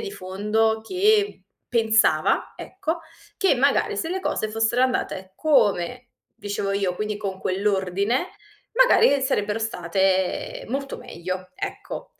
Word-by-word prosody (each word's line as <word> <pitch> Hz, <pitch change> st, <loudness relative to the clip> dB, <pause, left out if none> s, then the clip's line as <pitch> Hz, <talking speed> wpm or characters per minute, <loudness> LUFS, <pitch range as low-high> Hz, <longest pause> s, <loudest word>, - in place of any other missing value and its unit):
di 420 Hz, -3 st, -5 dB
fondo 215 Hz, -, 0 dB
che 410 Hz, -, +1 dB, 0.2 s
pensava, 225 Hz, -1 st, +2 dB
ecco, 340 Hz, -3 st, -4 dB, 0.4 s
che 385 Hz, -9 st, +3 dB
magari 275 Hz, +2 st, +2 dB
se 325 Hz, -, -2 dB
le 380 Hz, +1 st, -2 dB
cose 215 Hz, -, -1 dB
fossero 225 Hz, +3 st, +1 dB
andate 190 Hz, -7 st, -1 dB
come 245 Hz, -, +1 dB, 0.3 s
dicevo 200 Hz, -1 st, -3 dB
io, 195 Hz, -2 st, 0 dB
quindi 210 Hz, 0 st, -2 dB
con 195 Hz, -3 st, -4 dB
quell'ordine, 200 Hz, -, 0 dB, 0.5 s
magari 470 Hz, -, +5 dB
sarebbero 210 Hz, -4 st, 0 dB
state 190 Hz, -2 st, 0 dB
molto 275 Hz, +2 st, -3 dB
meglio. 185 Hz, -6 st, -6 dB
Ecco. -, -, -6 dB
220 Hz, 120 wpm, -24 LUFS, 195-275 Hz, 0.5 s, magari